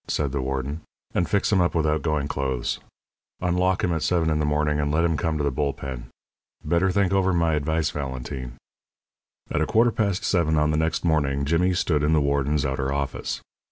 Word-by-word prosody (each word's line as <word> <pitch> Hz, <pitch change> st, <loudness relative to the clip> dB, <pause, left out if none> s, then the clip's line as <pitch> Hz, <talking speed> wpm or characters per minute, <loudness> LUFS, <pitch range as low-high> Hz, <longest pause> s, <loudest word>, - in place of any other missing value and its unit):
said 70 Hz, -3 st, -1 dB
the 70 Hz, -1 st, -1 dB
warden, 70 Hz, +4 st, -3 dB, 0.3 s
"and 85 Hz, -, 0 dB
fix 100 Hz, +1 st, +1 dB
him 95 Hz, -3 st, +4 dB
up 85 Hz, -, +1 dB
with 80 Hz, -2 st, +2 dB
outgoing 75 Hz, -1 st, 0 dB
clothes. 65 Hz, -4 st, -2 dB, 0.6 s
Unlock 90 Hz, +1 st, +1 dB
him 90 Hz, -, +1 dB
at 80 Hz, -, -1 dB
seven 85 Hz, -3 st, +1 dB
in 75 Hz, -, +1 dB
the 75 Hz, -, +1 dB
morning, 75 Hz, 0 st, +1 dB
and 75 Hz, 0 st, 0 dB
let 80 Hz, +3 st, +2 dB
him 85 Hz, -2 st, +2 dB
come 80 Hz, 0 st, -1 dB
to 75 Hz, -, -1 dB
the 70 Hz, -, +1 dB
bull 70 Hz, +1 st, -1 dB
pen. 65 Hz, -3 st, -7 dB, 0.6 s
Better 85 Hz, +2 st, +2 dB
think 95 Hz, 0 st, +1 dB
over 95 Hz, -1 st, +3 dB
my 85 Hz, -2 st, +2 dB
advice, 80 Hz, +1 st, 0 dB
Valentine." 65 Hz, -3 st, -5 dB, 0.9 s
At 75 Hz, -, 0 dB
a 80 Hz, -, +1 dB
quarter 115 Hz, +2 st, +4 dB
past 100 Hz, -4 st, -1 dB
seven 80 Hz, -4 st, +2 dB
on 75 Hz, 0 st, +2 dB
the -, -, 0 dB
next 80 Hz, +2 st, 0 dB
morning 70 Hz, -4 st, +1 dB
Jimmy 90 Hz, +4 st, +2 dB
stood 80 Hz, -4 st, +1 dB
in 75 Hz, +2 st, +2 dB
the 80 Hz, -, +4 dB
warden's 70 Hz, +1 st, +1 dB
outer 65 Hz, 0 st, -1 dB
office. 70 Hz, -2 st, -3 dB
75 Hz, 205 wpm, -24 LUFS, 70-85 Hz, 0.9 s, him